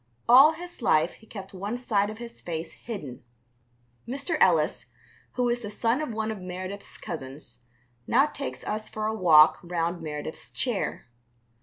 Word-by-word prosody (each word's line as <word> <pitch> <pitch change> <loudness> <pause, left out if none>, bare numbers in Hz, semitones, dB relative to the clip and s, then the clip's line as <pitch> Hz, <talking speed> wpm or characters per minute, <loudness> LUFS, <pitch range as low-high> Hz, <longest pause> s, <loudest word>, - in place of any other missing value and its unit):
All 270 +6 +9
his 345 -1 -9
life 160 -6 +3
he 220 - -19
kept 195 -3 -9
one 200 +5 -3
side 205 -5 +1
of 215 - -7
his 235 0 -9
face 165 -1 -4
hidden. 150 - -8 0.8
Mr. 280 +7 -1
Ellis, 165 -5 +3 0.5
who 250 -1 +1
is 240 0 0
the 205 - -5
son 230 +6 0
of 305 - -3
one 220 0 -2
of 210 -3 -6
Meredith's 185 +2 -7
cousins, 130 -2 -7 0.5
now 270 +4 +5
takes 285 -2 -5
us 215 0 -3
for 215 0 -4
a 220 - 0
walk 160 -7 +6
round 170 0 -2
Meredith's 150 0 -6
chair. 240 -6 -2
205 Hz, 160 wpm, -27 LUFS, 170-240 Hz, 0.8 s, All